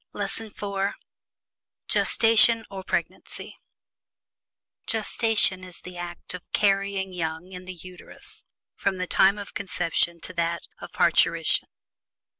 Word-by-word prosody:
LESSON 205 Hz, +2 st, -3 dB
IV 200 Hz, -1 st, -2 dB, 0.9 s
GESTATION 225 Hz, 0 st, +4 dB
OR 190 Hz, -1 st, -6 dB
PREGNANCY -, -, -4 dB, 1.3 s
Gestation 220 Hz, -4 st, +2 dB
is 180 Hz, -2 st, -10 dB
"the 180 Hz, 0 st, -9 dB
act 175 Hz, 0 st, -7 dB
of 180 Hz, -, -6 dB
carrying 195 Hz, -1 st, +1 dB
young 165 Hz, +1 st, -4 dB
in 180 Hz, -1 st, -8 dB
the 185 Hz, 0 st, -7 dB
Uterus, 180 Hz, +1 st, -13 dB, 0.3 s
from 195 Hz, -1 st, -1 dB
the 185 Hz, -, -1 dB
time 195 Hz, +2 st, +4 dB
of 205 Hz, -1 st, -8 dB
conception 170 Hz, -3 st, 0 dB
to 185 Hz, -, -6 dB
that 170 Hz, -1 st, -1 dB, 0.2 s
of -, -, -9 dB
parturition." -, -, +3 dB
190 Hz, 115 wpm, -26 LUFS, 180-200 Hz, 1.3 s, GESTATION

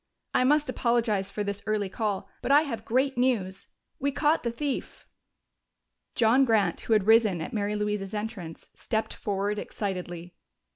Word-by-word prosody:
"I -, -, +3 dB
must 295 Hz, +3 st, +3 dB
apologize 235 Hz, -6 st, +1 dB
for 210 Hz, +1 st, -3 dB
this 200 Hz, 0 st, -3 dB
early 215 Hz, -2 st, 0 dB
call, 205 Hz, 0 st, -2 dB
but -, -, -1 dB
I 290 Hz, +2 st, +7 dB
have 230 Hz, -7 st, -5 dB
great 260 Hz, +2 st, +1 dB
news. 195 Hz, -7 st, 0 dB, 0.3 s
We 280 Hz, +1 st, 0 dB
caught 300 Hz, +3 st, +2 dB
the 235 Hz, -, -1 dB
thief!" 275 Hz, +4 st, -4 dB, 1.1 s
John 240 Hz, +4 st, +4 dB
Grant, 215 Hz, -8 st, +2 dB
who 225 Hz, -, 0 dB
had 210 Hz, -3 st, +3 dB
risen 220 Hz, -5 st, +5 dB
at 160 Hz, -, -5 dB
Mary 210 Hz, -1 st, -1 dB
Louise's 210 Hz, -1 st, -2 dB
entrance, 210 Hz, -6 st, -6 dB
stepped 220 Hz, -2 st, -2 dB
forward 205 Hz, +1 st, -2 dB
excitedly. 180 Hz, -4 st, -5 dB
215 Hz, 155 wpm, -27 LUFS, 200-245 Hz, 1.1 s, I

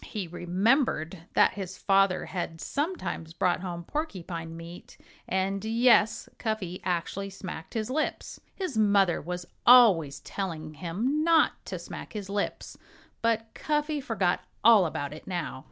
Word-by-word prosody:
He 205 Hz, -5 st, -5 dB
remembered 180 Hz, -, 0 dB
that -, -, +5 dB
his 195 Hz, -3 st, -6 dB
father 195 Hz, -1 st, +3 dB
had 170 Hz, -3 st, -4 dB
sometimes 190 Hz, -, -3 dB
brought 175 Hz, +1 st, +1 dB
home 175 Hz, -2 st, -5 dB
porcupine 170 Hz, -, -5 dB
meat 170 Hz, +1 st, -11 dB, 0.3 s
and 190 Hz, +1 st, 0 dB
yes, 230 Hz, 0 st, +3 dB
Cuffy 210 Hz, -6 st, -3 dB
actually 185 Hz, +2 st, -2 dB
smacked 185 Hz, -3 st, -8 dB
his 220 Hz, +2 st, -2 dB
lips! 305 Hz, +3 st, -2 dB
His 370 Hz, -, -4 dB
mother 200 Hz, -4 st, +3 dB
was 180 Hz, +2 st, -5 dB, 0.2 s
always 185 Hz, -, +6 dB
telling 160 Hz, -6 st, -5 dB
him 215 Hz, -, -1 dB
not 330 Hz, 0 st, +3 dB
to -, -, -4 dB
smack -, -, -8 dB
his 200 Hz, -2 st, -6 dB
lips, 205 Hz, 0 st, -3 dB, 0.4 s
but 225 Hz, -1 st, 0 dB
Cuffy 300 Hz, 0 st, -1 dB
forgot 190 Hz, -8 st, 0 dB, 0.2 s
all 220 Hz, -6 st, +7 dB
about 145 Hz, -2 st, -4 dB
it 155 Hz, -, -12 dB
now. 175 Hz, -7 st, -3 dB
195 Hz, 135 wpm, -28 LUFS, 170-230 Hz, 0.4 s, all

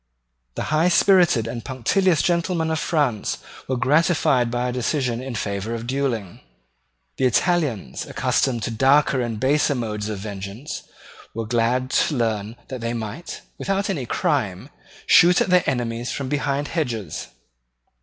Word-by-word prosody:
The -, -, -3 dB
high 160 Hz, +3 st, +4 dB
spirited 175 Hz, -, +4 dB
and 115 Hz, 0 st, -5 dB
punctilious 155 Hz, -, +1 dB
gentlemen 170 Hz, -2 st, 0 dB
of 160 Hz, -, 0 dB
France 145 Hz, -12 st, 0 dB, 0.3 s
were 130 Hz, -, -1 dB
gratified 135 Hz, -2 st, +3 dB
by 120 Hz, +1 st, -1 dB
a -, -, -1 dB
decision 125 Hz, -1 st, -1 dB
in 130 Hz, -2 st, -5 dB
favour 105 Hz, +1 st, -3 dB
of 115 Hz, 0 st, -6 dB
duelling. 120 Hz, -7 st, -2 dB, 0.8 s
The 130 Hz, -, +1 dB
Italians, 130 Hz, -, 0 dB
accustomed 120 Hz, -5 st, 0 dB
to 120 Hz, -, -2 dB
darker 135 Hz, +3 st, +3 dB
and 115 Hz, -3 st, -3 dB
baser 145 Hz, +3 st, +2 dB
modes 105 Hz, -3 st, -3 dB
of 105 Hz, -, -3 dB
vengeance, 100 Hz, +6 st, -6 dB, 0.5 s
were 115 Hz, 0 st, -3 dB
glad 120 Hz, +3 st, 0 dB
to 150 Hz, -, +2 dB
learn 110 Hz, -2 st, -1 dB
that 130 Hz, -2 st, -6 dB
they 115 Hz, +1 st, -2 dB
might, 115 Hz, +8 st, -6 dB, 0.2 s
without 195 Hz, +1 st, -1 dB
any 140 Hz, -10 st, -3 dB
crime, 130 Hz, -, -1 dB, 0.3 s
shoot 175 Hz, +1 st, +6 dB
at -, -, +1 dB
their 180 Hz, 0 st, +5 dB
enemies 120 Hz, -2 st, -2 dB
from 135 Hz, -2 st, -4 dB
behind 145 Hz, 0 st, -1 dB
hedges. 115 Hz, -, -3 dB
125 Hz, 145 wpm, -22 LUFS, 115-150 Hz, 0.8 s, shoot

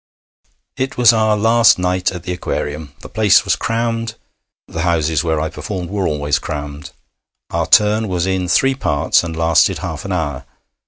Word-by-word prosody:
It 130 Hz, 0 st, -3 dB
was 120 Hz, -1 st, +6 dB
our 110 Hz, -1 st, +2 dB
last 115 Hz, +2 st, +4 dB
night 90 Hz, 0 st, 0 dB
at 90 Hz, -3 st, -8 dB
the 90 Hz, -, -4 dB
Aquarium. 75 Hz, -4 st, -4 dB
The -, -, -9 dB
place 105 Hz, -3 st, +3 dB
was -, -, +2 dB
crammed. 115 Hz, -1 st, -2 dB, 0.5 s
The 85 Hz, -, -5 dB
houses 80 Hz, -2 st, +1 dB
where 80 Hz, -2 st, 0 dB
I 80 Hz, -, -1 dB
performed 85 Hz, +4 st, -6 dB
were 100 Hz, -2 st, -1 dB
always 75 Hz, -1 st, 0 dB
crammed. 75 Hz, -2 st, -6 dB, 0.6 s
Our 85 Hz, -1 st, -1 dB
turn 105 Hz, +2 st, +4 dB
was 90 Hz, -2 st, -1 dB
in 95 Hz, -1 st, -1 dB
three 135 Hz, +10 st, +3 dB
parts, 75 Hz, -, +1 dB
and 85 Hz, -2 st, -5 dB
lasted 80 Hz, 0 st, +2 dB
half -, -, -6 dB
an 100 Hz, -, -6 dB
hour. 75 Hz, -7 st, -3 dB
90 Hz, 170 wpm, -17 LUFS, 80-110 Hz, 0.6 s, was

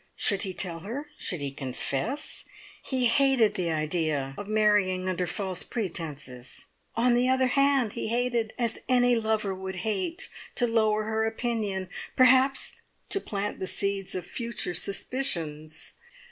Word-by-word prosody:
Should 200 Hz, -2 st, +3 dB
he 190 Hz, -, -2 dB
tell 175 Hz, -2 st, 0 dB
her 255 Hz, -, -6 dB
should 175 Hz, -5 st, -1 dB
he 140 Hz, -1 st, -3 dB
confess? 140 Hz, -, -2 dB, 0.4 s
He 260 Hz, -2 st, +1 dB
hated 260 Hz, -3 st, +5 dB
the 175 Hz, -2 st, -1 dB
idea 155 Hz, -3 st, 0 dB
of 205 Hz, -, -7 dB
marrying 205 Hz, -4 st, +2 dB
under 180 Hz, -1 st, -1 dB
false 185 Hz, 0 st, -2 dB
pretences. 150 Hz, -, -5 dB, 0.3 s
On 240 Hz, +2 st, +4 dB
the 245 Hz, +1 st, +3 dB
other 260 Hz, 0 st, +4 dB
hand 275 Hz, -3 st, +3 dB
he -, -, -3 dB
hated, 235 Hz, -1 st, 0 dB
as 235 Hz, -3 st, 0 dB
any 245 Hz, -1 st, +5 dB
lover 220 Hz, -3 st, 0 dB
would 190 Hz, 0 st, -5 dB
hate, 215 Hz, -, -1 dB, 0.3 s
to 245 Hz, -, +4 dB
lower 220 Hz, -2 st, +2 dB
her 220 Hz, +1 st, 0 dB
opinion, 220 Hz, -5 st, -2 dB, 0.3 s
perhaps 260 Hz, +1 st, +4 dB, 0.3 s
to 395 Hz, -, +1 dB
plant 205 Hz, 0 st, -3 dB
the 190 Hz, -, -2 dB
seeds 195 Hz, -1 st, -1 dB
of 180 Hz, -2 st, -3 dB
future 230 Hz, -4 st, -2 dB
suspicions. 165 Hz, -, -1 dB
210 Hz, 145 wpm, -28 LUFS, 180-245 Hz, 0.4 s, hated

